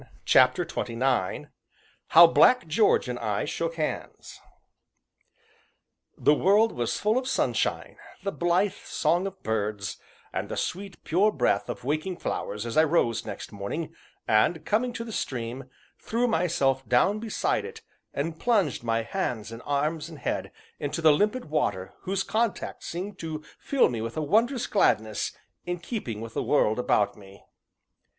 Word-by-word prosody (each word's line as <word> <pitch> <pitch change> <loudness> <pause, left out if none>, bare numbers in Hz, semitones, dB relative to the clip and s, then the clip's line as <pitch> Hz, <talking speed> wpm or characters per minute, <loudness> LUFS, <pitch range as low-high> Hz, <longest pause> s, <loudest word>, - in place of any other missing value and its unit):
CHAPTER 130 +7 +5
XXIX 120 - -1 0.6
HOW 170 +2 +9
BLACK 250 +8 +5
GEORGE 165 - +3
AND 125 0 -4
I 105 -3 -1
SHOOK 165 +3 -3
HANDS 155 -2 -5 1.8
The 150 - +4
world 205 +8 +4
was 120 -1 -2
full 215 +4 +2
of 255 - -6
sunshine, - - -1 0.3
the 200 - -1
blithe 180 +3 +1
song 180 -1 0
of 195 -1 -10
birds, 105 -2 -2 0.4
and - - -3
the - - -4
sweet, 195 -1 -4
pure 195 +6 +3
breath 120 - +1
of - - -5
waking 155 +7 -2
flowers 105 -8 -4
as 115 +5 -4
I 155 - +7
rose 130 -10 +1
next 105 - -7
morning, 150 +11 -5 0.3
and, 110 +10 +2
coming 235 +4 +1
to 230 - -4
the 230 - -8
stream, 125 - -4 0.3
threw 240 +2 0
myself 155 - +1
down 160 +13 +3
beside 225 -1 -1
it - - -9 0.3
and 160 +3 -3
plunged 200 - +1
my 115 -1 0
hands 115 - -3
and 115 +1 -8
arms 150 +3 -1
and 160 - -10
head - - -3 0.3
into 150 +3 -3
the 155 -2 +7
limpid 210 +10 +1
water 95 -11 -1
whose 195 +1 -2
contact 225 0 -2
seemed 190 +4 -5
to 155 -2 -5 0.2
fill 275 -2 +3
me 115 -3 -3
with 115 +4 -5
a 155 - 0
wondrous 230 - +2
gladness 110 - +1 0.4
in 175 0 -1
keeping 165 - -5
with 115 0 -7
the - - -1
world 115 -6 +2
about 105 -4 +2
me. 100 -1 -15
155 Hz, 155 wpm, -27 LUFS, 115-195 Hz, 1.8 s, HOW